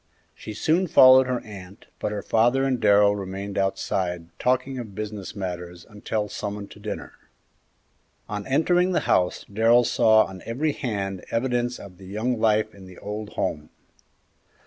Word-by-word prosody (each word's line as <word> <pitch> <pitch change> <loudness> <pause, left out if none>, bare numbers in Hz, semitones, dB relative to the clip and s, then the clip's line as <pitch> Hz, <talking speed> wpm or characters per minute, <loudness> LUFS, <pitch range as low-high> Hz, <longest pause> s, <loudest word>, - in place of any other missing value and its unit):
She 110 - -9
soon 165 - +1
followed 130 -5 +7
her 125 -1 -1
aunt, 100 -2 -12
but - - -2
her 105 -1 -4
father 120 +4 +2
and 130 -2 0
Darrell 100 -1 +5
remained 100 0 -6
outside 95 -3 -2
talking 130 +1 0
of 110 -5 -8
business 105 -2 -6
matters 90 -2 -6
until 105 0 -3
summoned 105 -1 -6
to - - -13
dinner. 105 +1 -6 1.1
On 105 -1 -5
entering 175 +6 +2
the - - +2
house 90 -1 +1
Darrell 115 +4 +4
saw 110 -2 +4
on 95 -1 -10
every 140 +7 -1
hand 100 -8 -4
evidences 120 0 -1
of 95 -2 -12
the 95 - -12
young 110 +5 -2
life 110 -1 +2
in 95 -2 -13
the 90 - -13
old 105 +1 -6
home. 75 0 -3
105 Hz, 155 wpm, -24 LUFS, 95-120 Hz, 1.1 s, followed